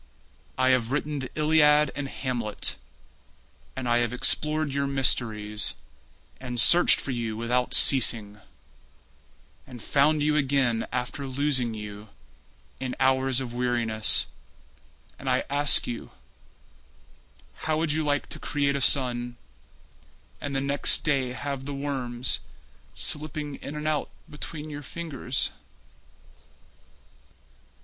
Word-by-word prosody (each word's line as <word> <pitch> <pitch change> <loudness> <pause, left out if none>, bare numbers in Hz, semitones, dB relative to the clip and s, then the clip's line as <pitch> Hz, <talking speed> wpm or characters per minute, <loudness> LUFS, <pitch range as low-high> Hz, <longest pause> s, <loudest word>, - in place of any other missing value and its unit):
I 130 0 +3
have 125 -2 +2
written 150 +1 -1
the 130 - -5
Iliad 150 -1 +4
and 140 0 -3
Hamlet; 120 -5 -3 1.0
And 130 -1 -4
I 120 0 +3
have 120 -1 0
explored 150 +3 +2
your 140 0 0
mysteries, 110 -6 0 0.6
And 125 -2 -4
searched 175 +9 +6
for 140 - -5
you 115 -3 -3
without 125 +2 0
ceasing, 110 -6 +5 1.3
And 125 -2 -10
found 145 +6 +2
you 150 0 +2
again 135 -5 +1
after 125 +3 -3
losing 130 -3 0
you 105 0 -8 0.7
In 130 -1 -4
hours 130 -1 +2
of 125 -3 -5
weariness— 120 -3 0 0.9
And 135 - -4
I 130 0 +2
ask 145 0 +3
you: 120 -1 -6 1.6
How 155 -1 +1
would 160 -1 0
you 155 +1 0
like 145 -1 0
to - - -5
create 140 -1 0
a 140 - -1
sun 120 -3 +2 1.0
And 140 -1 -4
the 135 - 0
next 140 +1 +3
day 135 -4 0
have 140 0 -5
the 140 0 -5
worms 130 -3 -3 0.6
Slipping 150 -1 -1
in 145 - -8
and 150 0 -4
out 155 -2 0 0.2
between 150 +1 -7
your 145 0 -6
fingers? 140 -3 -3
135 Hz, 120 wpm, -26 LUFS, 120-145 Hz, 1.6 s, searched